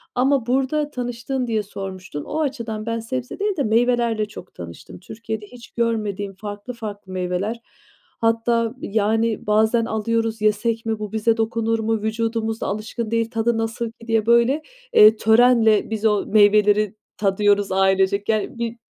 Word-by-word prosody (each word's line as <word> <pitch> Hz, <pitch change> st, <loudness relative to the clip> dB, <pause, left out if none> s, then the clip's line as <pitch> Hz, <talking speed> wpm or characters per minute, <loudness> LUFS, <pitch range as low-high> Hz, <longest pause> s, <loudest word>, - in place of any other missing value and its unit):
ama 260 Hz, -1 st, +2 dB
burada 270 Hz, +4 st, 0 dB
tanıştığın 245 Hz, +1 st, -3 dB
diye 220 Hz, -2 st, 0 dB
sormuştun. 190 Hz, -6 st, -7 dB
O 310 Hz, -, -4 dB
açıdan 230 Hz, -7 st, -3 dB
ben 230 Hz, 0 st, -2 dB
sebze 250 Hz, -, -5 dB
değil 405 Hz, -2 st, -1 dB
de 280 Hz, -, +1 dB
meyvelerle 230 Hz, -1 st, +1 dB
çok 185 Hz, -3 st, -12 dB
tanıştım. 85 Hz, -, -10 dB
Türkiye'de 220 Hz, +2 st, -6 dB
hiç 240 Hz, +2 st, -14 dB
görmediğim 210 Hz, -4 st, -2 dB
farklı 205 Hz, +4 st, -7 dB
farklı 205 Hz, -4 st, -8 dB
meyveler, 185 Hz, +5 st, -2 dB, 0.6 s
hatta, 230 Hz, 0 st, +1 dB
yani, 220 Hz, +1 st, 0 dB
bazen 220 Hz, +2 st, +3 dB
alıyoruz, 225 Hz, 0 st, -1 dB
"Yesek 225 Hz, +2 st, 0 dB
mi, 220 Hz, -1 st, -2 dB
bu 210 Hz, -2 st, -5 dB
bize 220 Hz, +1 st, +1 dB
dokunur 225 Hz, 0 st, 0 dB
mu, 220 Hz, 0 st, -1 dB
vücudumuz 225 Hz, 0 st, -2 dB
da -, -, -2 dB
alışkın 215 Hz, +2 st, -4 dB
değil, 230 Hz, 0 st, 0 dB
tadı 225 Hz, 0 st, 0 dB
nasıl 225 Hz, +1 st, -2 dB
ki?" 230 Hz, 0 st, -17 dB
diye, 225 Hz, -2 st, +1 dB
böyle, 235 Hz, +6 st, +3 dB, 0.3 s
eee, 215 Hz, +1 st, +8 dB
törenle 225 Hz, -1 st, +4 dB
biz 220 Hz, -1 st, -3 dB
o 210 Hz, -2 st, +2 dB
meyveleri 210 Hz, 0 st, +4 dB, 0.2 s
tadıyoruz 205 Hz, 0 st, +2 dB
ailecek. 195 Hz, +2 st, +2 dB
Yani, 215 Hz, +1 st, -1 dB
bir 235 Hz, 0 st, -3 dB
225 Hz, 150 wpm, -22 LUFS, 210-235 Hz, 0.6 s, eee